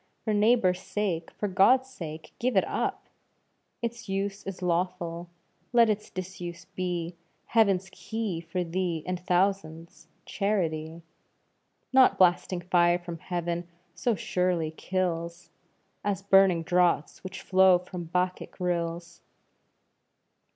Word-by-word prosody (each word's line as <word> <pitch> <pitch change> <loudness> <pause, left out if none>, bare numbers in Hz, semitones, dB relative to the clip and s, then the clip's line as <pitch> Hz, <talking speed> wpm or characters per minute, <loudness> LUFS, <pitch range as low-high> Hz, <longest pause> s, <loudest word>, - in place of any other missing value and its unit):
For 215 - 0
neighbour's 205 -4 +3
sake, 185 -7 -2
for 210 - -4
God's 245 +8 +4
sake, 160 -10 -8
give 245 -3 +1
it 190 - +4
up! - - -2 0.8
Its 235 -2 -4
use 195 +1 -2
is 190 -1 -6
lawful, 175 -1 -1 0.4
let 235 -2 +6
its 210 0 -4
disuse 175 -2 -7
be 180 -2 -3 0.3
Heaven's 195 -5 +3
key 215 -7 -4
for 170 +2 -3
thee 170 -2 -2
and 180 0 -2
thousands 175 -3 -1 0.2
Charity. 165 -5 -2 0.9
Not 260 -1 +6
blasting 180 0 +3
fire 175 0 +3
from 175 -2 -8
heaven 175 -1 -3 0.3
so 215 +7 0
surely 180 -3 0
kills, 170 -1 -3 0.5
As 200 -1 -1
burning 195 -4 +5
draughts 175 -3 +1
which 185 0 -7
flow 190 -1 +5
from 180 -1 -7
Bacchic 180 +3 -2
rills. 170 -1 -2
180 Hz, 115 wpm, -28 LUFS, 170-195 Hz, 0.9 s, let